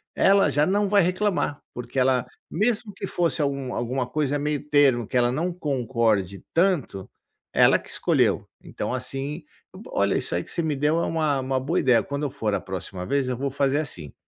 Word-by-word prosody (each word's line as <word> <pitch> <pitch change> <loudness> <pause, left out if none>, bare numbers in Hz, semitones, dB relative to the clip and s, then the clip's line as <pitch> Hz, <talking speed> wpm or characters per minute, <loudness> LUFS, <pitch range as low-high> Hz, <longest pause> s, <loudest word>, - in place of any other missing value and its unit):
ela 195 -5 +4
já 145 +2 +2
não 200 +3 +1
vai 205 0 +4
reclamar. 185 -4 0
Porque 125 +2 -4
ela 130 -1 +2 0.2
mesmo 210 +2 0
que 195 - -6
fosse 170 -4 0
algum 140 -3 -2
alguma 125 +1 -2
coisa 145 +1 -1
meio 150 0 -2
termo, 140 -5 +4
que 125 - -2
ela 120 0 +3
não 170 +6 -1
concorde 115 - -1
tanto 165 - 0 0.4
ela - - +5
que - - -14
escolheu. - - +1 0.2
Então - - -4
assim, 135 +5 -4 0.3
bo - - -12
olha - - +2
isso - - -3
aí 85 - -1
que - - -5
você 170 - -1
me 155 -3 -1
deu 150 +4 +2
é - - 0
uma 155 -4 0
uma 130 0 -1
boa 130 - 0
ideia, 125 -3 +4
quando 140 +1 -4
eu 145 - 0
for 115 -6 -2
a - - -2
próxima 95 -1 -6
vez 140 +5 0
eu 125 - -1
vou 140 +1 -2
fazer 140 +1 +1
assim, 85 - -6
140 Hz, 200 wpm, -24 LUFS, 125-160 Hz, 0.4 s, ela